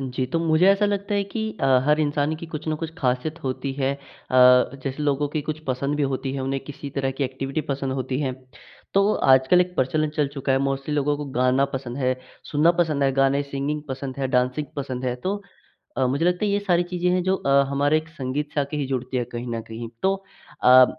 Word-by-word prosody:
जी, 130 Hz, -1 st, -2 dB
तो 165 Hz, +6 st, -1 dB
मुझे 165 Hz, +2 st, +3 dB
ऐसा 200 Hz, +1 st, +3 dB
लगता 200 Hz, 0 st, -1 dB
है 200 Hz, 0 st, +1 dB
कि 210 Hz, +3 st, -5 dB, 0.2 s
अ, -, -, +2 dB, 0.2 s
हर 150 Hz, +1 st, +4 dB
इंसान 145 Hz, 0 st, +1 dB
की 165 Hz, -, -8 dB
कुछ 155 Hz, -1 st, -7 dB
न 155 Hz, -, +1 dB
कुछ 160 Hz, +1 st, -5 dB
खासियत 140 Hz, +5 st, -1 dB
होती 135 Hz, +1 st, -3 dB
है 135 Hz, 0 st, 0 dB
अ, -, -, -14 dB, 0.9 s
जैसे 135 Hz, +2 st, -3 dB
लोगों 145 Hz, 0 st, +1 dB
की 150 Hz, +1 st, -2 dB
कुछ 155 Hz, 0 st, -2 dB
पसंद 140 Hz, +3 st, -1 dB
भी 150 Hz, -, 0 dB
होती 130 Hz, 0 st, -3 dB
है, 135 Hz, -, -3 dB
उन्हें 135 Hz, +1 st, -1 dB
किसी 140 Hz, 0 st, -8 dB
तरह 135 Hz, -1 st, -1 dB
की 140 Hz, -, +1 dB
एक्टिविटी 135 Hz, +3 st, -3 dB
पसंद 135 Hz, -1 st, -2 dB
होती 130 Hz, 0 st, -2 dB
है। 135 Hz, -3 st, -1 dB, 0.6 s
तो 200 Hz, +2 st, +4 dB, 0.2 s
आजकल 130 Hz, +7 st, +5 dB
एक 180 Hz, 0 st, 0 dB
प्रचलन 155 Hz, +4 st, +1 dB
चल 150 Hz, -2 st, +2 dB
चुका 135 Hz, -1 st, -1 dB
है, 135 Hz, -, +3 dB
मोस्टली 135 Hz, +2 st, -1 dB
लोगों 145 Hz, 0 st, +1 dB
को 145 Hz, -, -5 dB
गाना 130 Hz, +2 st, +3 dB
पसंद 130 Hz, -2 st, -4 dB
है, 130 Hz, -1 st, +1 dB, 0.3 s
सुनना 155 Hz, +3 st, +4 dB
पसंद 155 Hz, -4 st, +1 dB
है, 135 Hz, -, +4 dB
गाने 135 Hz, +1 st, +2 dB
सिंगिंग 140 Hz, +2 st, -3 dB
पसंद 130 Hz, 0 st, -5 dB
है, 135 Hz, -1 st, -1 dB
डांसिंग 125 Hz, +3 st, +1 dB
पसंद 130 Hz, -2 st, -4 dB
है। 125 Hz, -1 st, 0 dB
तो 195 Hz, +10 st, -3 dB, 0.6 s
अ, 130 Hz, -, +3 dB
मुझे 140 Hz, +6 st, 0 dB
लगता 180 Hz, +3 st, +2 dB
है, 205 Hz, -, +1 dB
ये 200 Hz, -, +2 dB
सारी 175 Hz, -3 st, +2 dB
चीज़ें 180 Hz, 0 st, +1 dB
हैं, 180 Hz, 0 st, +2 dB
जो 190 Hz, +1 st, +1 dB
अ, 140 Hz, -4 st, +3 dB
हमारे 145 Hz, +2 st, +2 dB
एक 155 Hz, +1 st, -9 dB
संगीत 145 Hz, 0 st, -4 dB
से 145 Hz, -, +2 dB
आके 140 Hz, +2 st, -3 dB
ही 145 Hz, -2 st, -1 dB
जुड़ती 130 Hz, -1 st, -3 dB
है, 125 Hz, -, 0 dB
कहीं 120 Hz, 0 st, -6 dB
न -, -, -3 dB
कहीं। 115 Hz, +1 st, -6 dB
तो 195 Hz, 0 st, +3 dB, 0.5 s
अ, 130 Hz, +1 st, +9 dB
140 Hz, 230 wpm, -24 LUFS, 130-155 Hz, 0.9 s, अ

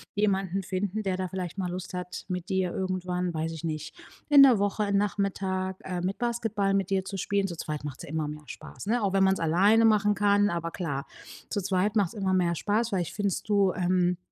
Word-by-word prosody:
jemanden 195 Hz, -2 st, +1 dB
finden, 195 Hz, +3 st, -2 dB
der 190 Hz, -2 st, -1 dB
da 185 Hz, 0 st, -2 dB
vielleicht 180 Hz, -1 st, -5 dB
mal 180 Hz, -2 st, -2 dB
Lust 185 Hz, +1 st, -6 dB
hat, 180 Hz, 0 st, -6 dB
mit 180 Hz, +1 st, -4 dB
dir 190 Hz, -2 st, 0 dB
irgendwann- 180 Hz, -1 st, -2 dB
weiß 160 Hz, 0 st, -2 dB
ich 160 Hz, -, -8 dB
nicht- 155 Hz, -1 st, -4 dB, 0.3 s
in 285 Hz, -2 st, +9 dB
der 255 Hz, -6 st, +6 dB
Woche, 205 Hz, 0 st, 0 dB
Nachmittag, 195 Hz, -2 st, -1 dB
ähm, 180 Hz, -2 st, -3 dB
mit 190 Hz, +2 st, -2 dB
Basketball 225 Hz, -4 st, 0 dB
mit 195 Hz, 0 st, -1 dB
dir 190 Hz, -1 st, +2 dB
zu 195 Hz, 0 st, -5 dB
spielen. 200 Hz, +1 st, 0 dB
Zu 170 Hz, -3 st, -7 dB
zweit 150 Hz, -2 st, -4 dB
macht's 145 Hz, -3 st, -6 dB
ja -, -, -9 dB
immer 155 Hz, -1 st, -2 dB
mehr 150 Hz, 0 st, -7 dB
Spaß, -, -, -9 dB
ne? 240 Hz, +3 st, +1 dB
Auch 195 Hz, -, +1 dB
wenn 195 Hz, -1 st, +4 dB
man's 190 Hz, 0 st, +3 dB
alleine 195 Hz, +8 st, +4 dB
machen 210 Hz, -2 st, +4 dB
kann, 205 Hz, 0 st, +3 dB
aber 170 Hz, -1 st, -2 dB
klar, 145 Hz, -6 st, -3 dB, 0.4 s
zu 205 Hz, -, -1 dB
zweit 195 Hz, +3 st, 0 dB
macht's 200 Hz, -5 st, +2 dB
immer 195 Hz, -3 st, -1 dB
mehr 175 Hz, -2 st, +2 dB
Spaß. 215 Hz, +6 st, 0 dB
Vielleicht 185 Hz, -6 st, -2 dB
findest 205 Hz, 0 st, -2 dB
du, 200 Hz, -3 st, +3 dB
ähm, 180 Hz, -1 st, +1 dB
190 Hz, 215 wpm, -28 LUFS, 175-205 Hz, 0.4 s, in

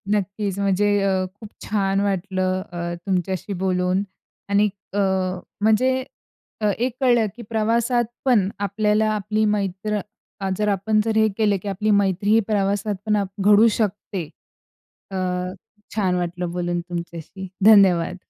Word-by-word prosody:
नक्कीच 200 Hz, 0 st, -2 dB
म्हणजे 200 Hz, +1 st, +2 dB, 0.2 s
अ, 190 Hz, -1 st, +1 dB
खूप 215 Hz, -1 st, -11 dB, 0.2 s
छान 195 Hz, -2 st, 0 dB
वाटलं 185 Hz, -1 st, -1 dB
अ, 175 Hz, 0 st, -4 dB
तुमच्याशी 190 Hz, +1 st, -1 dB
बोलून 185 Hz, +1 st, +1 dB, 0.5 s
आणि 205 Hz, +1 st, +3 dB, 0.2 s
अ, 205 Hz, -, 0 dB, 0.6 s
म्हणजे 220 Hz, +4 st, +4 dB, 0.7 s
अ, -, -, +1 dB
एक 245 Hz, +1 st, -1 dB
कळलं 240 Hz, -3 st, +4 dB
की 240 Hz, -, -9 dB
प्रवासात 235 Hz, +2 st, +1 dB, 0.2 s
पण 210 Hz, -7 st, +3 dB
आपल्याला 210 Hz, +2 st, +1 dB
आपली 215 Hz, +1 st, 0 dB
मैत्र 210 Hz, 0 st, -1 dB, 0.6 s
जर 210 Hz, -, 0 dB
आपण 205 Hz, +2 st, +1 dB
जर 220 Hz, -1 st, 0 dB
हे 220 Hz, 0 st, +5 dB
केलं 210 Hz, -2 st, +2 dB
की -, -, -8 dB
आपली 205 Hz, +2 st, 0 dB
मैत्री 200 Hz, -1 st, +2 dB
ही 225 Hz, -, +6 dB
प्रवासात 205 Hz, 0 st, 0 dB
पण 210 Hz, -1 st, +2 dB, 0.2 s
घडू 205 Hz, +3 st, +6 dB
शकते. 205 Hz, -4 st, -2 dB, 0.9 s
अ, 190 Hz, -, -3 dB, 0.8 s
छान 190 Hz, -4 st, +1 dB
वाटलं 175 Hz, 0 st, -2 dB
बोलून 175 Hz, 0 st, -2 dB
तुमच्याशी. 170 Hz, +2 st, -7 dB, 0.2 s
धन्यवाद. 190 Hz, -5 st, +6 dB
200 Hz, 130 wpm, -22 LUFS, 185-215 Hz, 0.9 s, ही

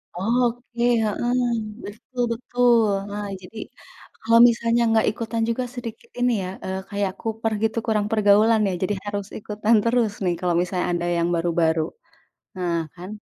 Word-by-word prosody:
oke, 240 Hz, +4 st, -1 dB, 0.2 s
heeh, 240 Hz, +4 st, 0 dB, 0.5 s
betul 245 Hz, +4 st, -5 dB
betul. 245 Hz, 0 st, +2 dB, 0.3 s
Nah, 205 Hz, 0 st, -4 dB
jadi 185 Hz, +4 st, -12 dB, 0.6 s
kalau 230 Hz, +1 st, +4 dB
misalnya 235 Hz, 0 st, +1 dB
nggak 225 Hz, 0 st, +3 dB
ikutan 225 Hz, +1 st, -3 dB
juga 235 Hz, +2 st, -1 dB
sedikit 245 Hz, -, -8 dB
ini, 245 Hz, 0 st, +3 dB
ya, 185 Hz, -, -4 dB, 0.2 s
eee, 190 Hz, 0 st, -3 dB
kayak 200 Hz, -1 st, -1 dB
kuper 225 Hz, 0 st, -2 dB
gitu, 225 Hz, +1 st, 0 dB
kurang 210 Hz, -2 st, +1 dB
pergaulan, 215 Hz, +1 st, +4 dB
ya. -, -, 0 dB
Jadi 205 Hz, -, 0 dB
harus 205 Hz, -1 st, -4 dB
ikutan 215 Hz, +2 st, +1 dB
terus 230 Hz, -2 st, +2 dB
nih 180 Hz, -2 st, +1 dB
kalau 175 Hz, -2 st, +1 dB
misalnya 180 Hz, 0 st, -2 dB
ada 175 Hz, 0 st, -1 dB
yang 170 Hz, +1 st, +1 dB
baru-baru. 165 Hz, -1 st, +1 dB, 0.8 s
Nah, 175 Hz, -2 st, -1 dB, 0.2 s
kan 180 Hz, +1 st, -9 dB
220 Hz, 150 wpm, -23 LUFS, 190-230 Hz, 0.8 s, kalau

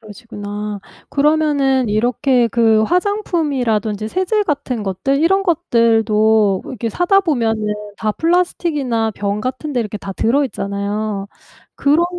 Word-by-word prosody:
그러시구나. 210 Hz, -2 st, -7 dB, 0.3 s
그러면은 285 Hz, -4 st, +2 dB
이렇게 240 Hz, +3 st, +2 dB
그 225 Hz, -1 st, +3 dB
화장품이라든지 265 Hz, -, 0 dB
세제 375 Hz, -, 0 dB
같은 280 Hz, -, -2 dB
것들 240 Hz, +9 st, -1 dB
이런 385 Hz, +4 st, +3 dB
것들도 220 Hz, -, +2 dB
이렇게 235 Hz, -2 st, -4 dB
사다 355 Hz, -, +3 dB
보면은 225 Hz, -, 0 dB, 0.2 s
다 215 Hz, -1 st, -1 dB
플라스틱이나 300 Hz, -, 0 dB
병 200 Hz, +1 st, -2 dB
같은 255 Hz, +6 st, -4 dB
데 250 Hz, -, 0 dB
이렇게 210 Hz, -2 st, -4 dB
다 195 Hz, -1 st, -6 dB
들어 265 Hz, +9 st, +1 dB
있잖아요. 200 Hz, -2 st, -3 dB, 0.5 s
그런 300 Hz, +4 st, +3 dB
235 Hz, 305 characters per minute, -18 LUFS, 215-300 Hz, 0.5 s, 그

